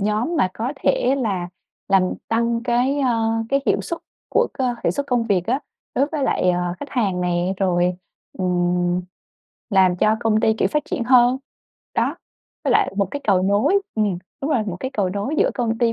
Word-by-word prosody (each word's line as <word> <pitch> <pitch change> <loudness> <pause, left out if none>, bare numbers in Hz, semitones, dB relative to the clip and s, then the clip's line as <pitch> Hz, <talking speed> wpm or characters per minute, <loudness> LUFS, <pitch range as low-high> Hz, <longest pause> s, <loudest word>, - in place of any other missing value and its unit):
nhóm 215 +11 0
mà 190 - +3
có 240 +5 -2
thể 265 -1 +2
là 195 -8 -1 0.4
làm 195 -1 +5 0.3
tăng 230 +1 +1
cái, 250 +3 +1
ơ, 230 -4 +1 0.2
cái 275 +2 +2
hiệu - - +2
suất 335 - -5 0.3
của - - +2
cơ 255 -3 0
hiệu - - +3
suất 285 0 -3
công 245 -2 +1
việc 195 -4 +1
á 255 +4 +1 0.3
đối 275 +3 +2
với 300 -2 -3
lại, 185 -8 +2
ờ, 175 0 -1
khách 290 - -6
hàng 200 -8 0
nè, 175 +1 0
rồi, 180 -2 +1 0.4
ừm, 180 -1 +1 0.7
làm 185 -3 +4
cho 215 +4 +3
công 220 -2 +2
ty, 220 -2 +3
kiểu, - - +2
phát 300 -1 0
triển 240 - -3
hơn, 250 +1 +5 0.6
đó, - - 0 0.5
với - - +1
lại - - +3
một 200 -3 +1
cái 285 - -4
cầu 190 -3 +3
nối 205 - +3
ừm, 205 -5 0 0.2
đúng 280 - -1
rồi, 240 -7 +2
một 185 -4 -3
cái 260 - -3
cầu 205 -7 0
nối 205 +10 -2
giữa - - +3
công 230 -3 -1
ty 235 -2 +2
220 Hz, 200 wpm, -21 LUFS, 185-255 Hz, 0.7 s, làm